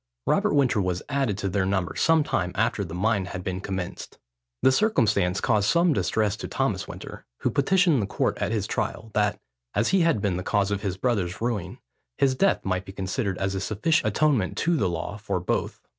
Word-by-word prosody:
Robert - - +2
Winter 125 -7 +3
was 90 -1 -2
added 135 -8 0
to 100 - -2
their 95 0 0
number 95 -2 -1
some 160 -1 +3
time 90 -9 -1
after 110 0 +1
the 85 -3 -6
mine 100 +1 +1
had 90 0 -6
been 95 0 -3
commenced. 95 -1 -5 0.5
The 130 - +6
circumstance 110 - +2
caused 105 -1 +2
some 170 -1 +4
distress 105 -6 0
to - - -5
Thomas - - -1
Winter, - - -9
who - - +1
petitioned 165 - +3
the 100 - -2
court - - 0
at - - -1
his - - 0
trial, 110 - -3
that, 105 -1 +1 0.4
as - - +2
he 190 -1 +3
had 165 -8 +3
been 100 -3 0
the 90 - -4
cause 100 +1 +1
of 100 -1 -1
his 95 -3 -3
brother's 100 -6 -1
ruin, 105 -6 -2 0.4
his 135 -1 +3
death 195 +9 +1
might 95 -1 -1
be 95 - -8
considered 95 +1 -2
as 95 0 -1
a 95 - -2
sufficient 110 - +1
atonement 140 -11 +1
to 170 0 +2
the 100 - +1
law 85 +4 -4
for 105 -3 -2
both. 90 - -2
105 Hz, 205 wpm, -25 LUFS, 95-130 Hz, 0.5 s, The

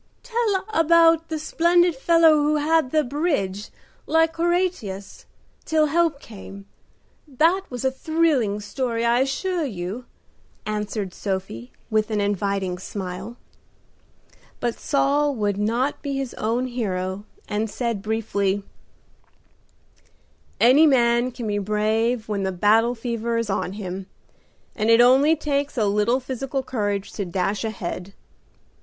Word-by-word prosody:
"Tell 460 -5 0
about 330 -1 +4
the 320 - -2
splendid 340 +2 +2
fellow 330 +4 +5
who 300 +1 +2
held 305 -1 +2
the 310 +2 +2
bridge, 245 - -2 0.4
like 325 0 +2
Horatius, 340 - -2 0.4
till 315 -1 +2
help 320 -1 +1
came 200 -4 -11 0.7
up. 260 - -18
That 340 +6 +4
was 250 0 -5
a 265 - +3
thrilling 270 -8 0
story, 230 +2 -2
I 235 +1 +3
assure 330 +7 -1
you," 210 -1 -5 0.6
answered 210 -2 -3
Sophie, 190 - -5 0.2
with 215 0 +1
an 215 -1 -1
inviting 200 -2 -1
smile. 190 +4 -6 1.2
But 240 -1 -2
Saul 285 0 +1
would 205 -3 -1
not 235 +7 0
be 280 -1 -3
his 270 -2 -4
own 230 +4 -1
hero, 195 -6 -3 0.2
and 215 +1 -2
said 230 -3 -3
briefly: 205 -2 -1 2.0
"Any 270 +7 +6
man 240 -2 +3
can 245 -1 -7
be 205 -1 -1
brave 220 +3 0
when 205 -2 -2
the 190 0 -1
battle 220 +6 +3
fever 230 0 -2
is 230 -3 -1
on 190 - -2
him, 190 -2 -6 0.7
and 215 0 0
it 230 0 +6
only 265 +6 +6
takes 285 -2 -2
a 220 - +2
little 210 +5 +2
physical 265 +1 -4
courage 205 -6 -2
to 200 - -3
dash 190 +3 -2
ahead." 195 -3 -5
235 Hz, 130 wpm, -23 LUFS, 205-290 Hz, 2.0 s, Any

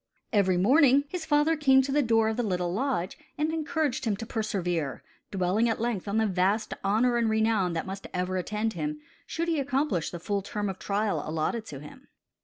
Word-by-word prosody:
Every 190 -4 +3
morning 270 - +5
his 350 -2 -5
father 295 +2 +3
came 265 -3 +5
to 270 - -3
the 295 +2 +3
door 225 -3 +3
of 220 - 0
the 245 - 0
little 180 -5 -1
lodge 230 -5 -2 0.2
and 305 +2 0
encouraged 310 -5 -1
him 210 -3 0
to 225 - -6
persevere, 180 - -2 0.3
dwelling 195 +5 +1
at 225 - -1
length 230 -4 -2
on 200 +2 0
the 220 - +3
vast 195 +2 +1
honor 230 +5 +2
and 230 -1 +2
renown 220 -5 +2
that 165 - -2
must 195 +1 -6
ever 180 +1 -2
attend 210 +4 -2
him, 150 -3 -3 0.3
should 335 +1 -2
he 325 -3 +1
accomplish 275 - 0
the 175 - -7
full 200 +3 -1
term 205 +1 -3
of 190 - -6
trial 200 -5 -1
allotted 165 +9 -2
to 140 - -7
him. 150 - -13
215 Hz, 205 wpm, -28 LUFS, 185-260 Hz, 0.3 s, morning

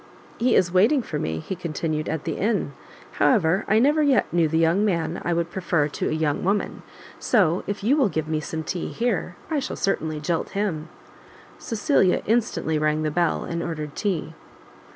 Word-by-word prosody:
"He 245 +2 +3
is 175 -2 +3
waiting 225 +9 +4
for 150 - -4
me," 80 - -2
he 135 - -5
continued, 155 -2 -3
"at 160 -2 -3
the - - -2
inn; 215 +1 0 0.5
however, 190 -6 +3
I 215 - +3
never 290 +6 +4
yet 285 -3 +3
knew 170 -2 +3
the 160 +1 0
young 165 +5 +3
man 170 -5 -1
I 175 - -1
would 170 0 -1
prefer 175 -5 0
to - - -2
a - - -2
young 155 -2 0
woman, 200 +2 -1 0.4
so 185 -7 +2
if 205 0 -4
you 250 +7 +4
will 270 -8 +3
give 160 -3 -2
me 155 -1 -1
some 160 +1 -4
tea 175 +2 -3
here, 230 -6 -2 0.2
I 305 - +1
shall 270 - -4
certainly 160 -5 -1
jilt 165 +2 -2
him." 170 -7 -2 0.7
Cecilia 225 - +1
instantly 215 -8 0
rang 155 0 +1
the 155 - 0
bell, 170 +1 +1
and 170 0 -3
ordered 155 -3 -5
tea. 175 -6 -2
175 Hz, 190 wpm, -24 LUFS, 155-210 Hz, 0.7 s, waiting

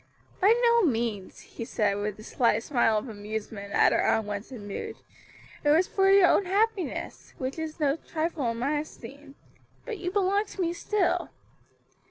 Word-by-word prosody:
"By 435 +5 +5
no 470 0 +5
means," 230 - -1
he - - -8
said, 210 -3 0
with 205 0 -3
a - - -10
slight 230 -1 +1
smile 240 -6 +2
of 210 - -3
amusement 210 -1 -6
at - - +5
her - - +2
unwonted 215 +3 -1
mood. 205 -1 -6 0.7
"It 295 - +2
was 320 +5 +5
for 385 0 +2
your 390 -1 +7
own 400 - +3
happiness, 390 -3 -2
which 265 +4 -4
is 320 0 -5
no 290 0 +2
trifle 315 -5 -2
in 230 - -3
my 285 +5 0
esteem. 280 -1 -10 0.5
But 455 -5 -5
you 360 - -2
belong 400 +2 +1
to 390 - -6
me 340 -1 0
still." 370 +2 0
290 Hz, 170 wpm, -27 LUFS, 225-370 Hz, 0.7 s, your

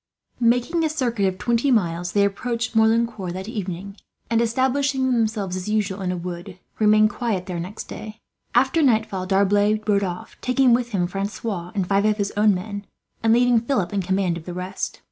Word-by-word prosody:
Making 245 +8 +2
a 315 - +2
circuit 240 -9 0
of 185 -1 -2
twenty 235 +6 +1
miles, 175 -7 +1
they 200 -1 +4
approached 230 +3 -2
Merlincourt 220 -4 +2
that 190 +2 -6
evening 200 -3 -5 0.3
and, 230 0 +3
establishing 260 +2 +1
themselves 220 -5 0
as 185 +2 -4
usual 205 -2 -1
in 180 -1 -1
a 180 - -3
wood, 175 0 -7 0.2
remained 215 0 +5
quiet 205 -6 -2
there 175 -2 -4
next 185 +5 -6
day. 215 0 -9 0.4
After 265 +6 +3
nightfall 220 -8 +1
D'Arblay 205 +2 +3
rode 200 -1 +3
off, 180 -2 -5
taking 255 -1 +3
with 240 0 +1
him 190 -6 0
Francois 195 -1 -4
and 195 -3 0
five 200 +1 +2
of 215 0 +2
his 200 -1 -2
own 210 -1 +4
men, 200 +2 -6 0.3
and 225 - +3
leaving 245 0 +4
Philip 225 -5 -1
in 200 - +1
command 190 -1 0
of 160 - -10
the 175 - -6
rest. 185 +1 -4
210 Hz, 185 wpm, -23 LUFS, 190-235 Hz, 0.4 s, remained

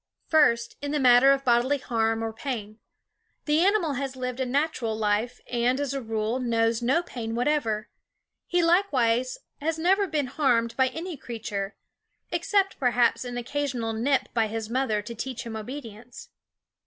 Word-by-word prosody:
First, 235 -7 +3
in 285 - -3
the 295 +1 0
matter 250 +1 +7
of 275 0 +1
bodily 245 +3 +3
harm 225 -3 0
or 225 0 -3
pain: 220 -3 -5 0.7
The 300 +1 +2
animal 370 -4 +3
has 270 0 -3
lived 250 0 -4
a 260 - 0
natural 255 -4 0
life 220 +3 0
and, 245 +2 0
as 285 -2 -2
a 275 - -3
rule, 225 +1 -2
knows 230 -1 +1
no 270 +9 +2
pain 230 -8 -5
whatever. 235 -5 0 0.6
He 355 -1 +2
likewise 255 -9 +2 0.2
has 320 +2 -1
never 385 +5 +2
been 305 -4 0
harmed 245 -4 +1
by 260 -1 +3
any 330 +4 -5
crea 240 -3 -7
ture 200 -2 -4 0.6
except 395 -4 +1
perhaps 245 -2 +2
an 245 -1 -5
occasional 245 -3 -2
nip 260 +5 +1
by 225 -2 +2
his 220 0 -5
mother, 235 -5 0
to 235 - -7
teach 240 +2 -5
him 225 -1 -6
obedience. 235 0 -8
245 Hz, 165 wpm, -26 LUFS, 225-285 Hz, 0.7 s, matter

